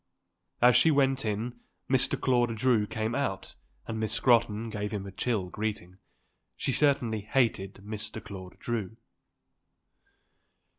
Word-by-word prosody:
As 125 0 +7
she 165 - +6
went 135 -3 +2
in 115 +3 -3 0.3
Mr. 130 -1 +2
Claude 120 -3 +2
Drew 115 -3 +2
came 110 +3 -2
out 125 -8 -2 0.3
and 110 -1 -4
Miss 110 0 -1
Scrotton 115 -1 +2
gave 105 -1 -3
him 100 -2 -4
a 100 - -7
chill 100 -1 -1
greeting. 100 -3 -4 0.6
She - - -1
certainly 125 -7 +2
hated 110 -4 0
Mr. 110 +1 -5
Claude 95 -4 -9
Drew. 110 -2 -4
110 Hz, 130 wpm, -29 LUFS, 105-125 Hz, 0.6 s, As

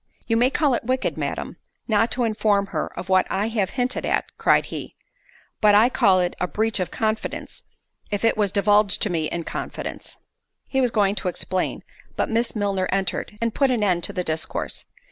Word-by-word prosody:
—— - - -36
"You 225 - +2
may 245 +3 +4
call 285 -1 +2
it 235 - -1
wicked, 255 +2 -1
Madam, - - -4 0.3
not 225 0 +3
to 250 - 0
inform 215 -3 +2
her - - -2
of - - -5
what 185 -1 +3
I 205 +3 0
have 210 -4 0
hinted 250 +1 0
at," - - -1
cried - - +3
he; - - -6 0.7
"but 210 -1 +6
I 220 +4 +6
call 190 -6 +4
it 180 0 -1
a 180 - +1
breach 220 +2 0
of 180 - -1
confidence—if 215 -1 -4
it 225 - +3
was 205 -3 +1
divulged 205 +1 +3
to 210 - 0
me 160 -2 0
in 170 - -3
confidence——" - - -6 0.5
He 265 - 0
was 250 - +3
going 205 -3 +2
to 190 -2 -3
explain; 180 +1 -2 0.3
but - - -1
Miss 230 +1 0
Milner 200 -3 0
entered, 195 +2 -2
and 230 -1 0
put 275 -2 +2
an 240 -4 +1
end 180 -4 +1
to - - -1
the 180 - -2
discourse. 160 -1 -3
210 Hz, 200 wpm, -23 LUFS, 190-230 Hz, 0.7 s, but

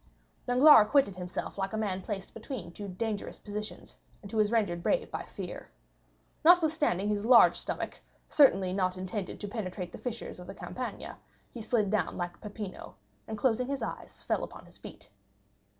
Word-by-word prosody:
Danglars 255 +1 +8
acquitted 265 -7 +3
himself 180 +2 -5
like 195 +1 -2
a - - -1
man 195 -4 -1
placed 195 -1 -5
between 220 - -7
two 205 +3 -7
dangerous 205 +2 -4
positions, 210 0 -7 0.3
and 200 - -9
who 220 - 0
is 210 -1 +4
rendered 200 -7 +1
brave - - 0
by - - -3
fear. - - -8 0.7
Notwithstanding 315 - +4
his 205 -1 0
large 235 +1 +7
stomach, - - -4 0.3
certainly 195 -11 +4
not 185 -1 0
intended 185 +1 -4
to 205 - -4
penetrate 185 -4 -5
the - - -9
fissures 235 -6 -5
of 180 - -10
the 195 - -8
Campagna, 250 +5 -6 0.3
he 235 - -6
slid 215 -2 +1
down 215 - 0
like 175 -1 -4
Peppino, 210 -2 -7 0.3
and 220 - -4
closing 250 +2 +1
his 275 -3 -3
eyes - - -7
fell - - 0
upon - - -9
his - - -15
feet. 100 - -11
210 Hz, 170 wpm, -30 LUFS, 185-235 Hz, 0.7 s, Danglars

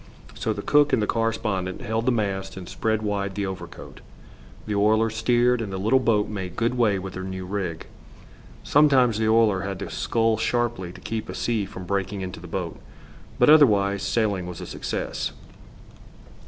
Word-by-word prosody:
So - - -2
the - - -4
cook 145 -1 +4
and - - +4
the 105 - +1
correspondent 110 -5 -1
held 110 +2 -2
the - - +5
mast 95 -4 -2
and 90 -2 -8
spread 110 +3 -1
wide 100 -2 -2
the 100 - -1
overcoat. 95 -1 -8 0.6
The 105 - -3
oiler 110 +2 +3
steered, 120 +2 +2
and 105 -3 -4
the 95 - -3
little 110 +7 +3
boat 110 -4 +2
made 95 -4 -5
good 115 +4 0
way 110 -5 +2
with 95 0 -6
her 95 - -5
new 95 0 -5
rig. 90 -4 -4 0.8
Sometimes 130 -6 +4
the 110 0 +2
oiler 110 -4 +4
had 100 -1 -4
to - - -6
scull 115 -1 +1
sharply 120 -7 -1
to - - -13
keep 110 -1 -4
a - - -5
sea 110 -4 -1
from 90 - -9
breaking 100 +1 -2
into 95 -1 -6
the 90 - -10
boat, 85 0 -4 0.6
but - - +4
otherwise 100 -10 +5
sailing 100 -2 0
was 90 -2 -7
a - - -6
success. - - -4
105 Hz, 180 wpm, -24 LUFS, 95-115 Hz, 0.8 s, the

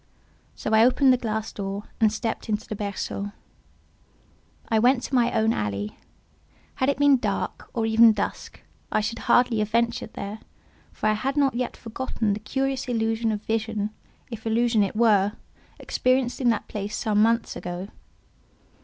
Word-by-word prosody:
So 220 - -3
I 220 +1 +7
opened 255 +2 +5
the - - +2
glass 220 -2 -3
door 200 0 -4 0.2
and 220 -2 +4
stepped 225 +1 -3
into 210 0 -2
the 215 - -4
berceau. 200 0 -4 1.3
I 220 -2 +2
went 245 +2 +3
to - - -6
my 240 -2 +3
own 225 0 +2
alley: 105 - -3 0.8
had 260 - +2
it 280 - +1
been 285 -1 +5
dark, 245 - -3
or 230 -3 -1
even 225 +1 +6
dusk, 210 -2 -4 0.3
I - - +2
should 220 +2 -3
have - - -10
hardly 245 -3 +4
ventured 230 +1 -1
there, 205 +2 -6 0.5
for - - -6
I 215 - +4
had 265 +6 -2
not 275 -2 +3
yet 250 +1 -3
forgotten 225 -2 -2
the 205 - -3
curious 270 +4 -2
illusion 225 -1 0
of 210 0 -4
vision 220 -1 -2 0.4
(if 225 -1 -6
illusion 230 0 +2
it 200 0 0
were) 210 -3 +4 0.5
experienced 255 0 0
in 245 - +3
that 225 - 0
place 210 0 -4
some 210 -1 +1
months 230 +1 +2
ago. 180 +2 -5
225 Hz, 165 wpm, -25 LUFS, 210-240 Hz, 1.3 s, I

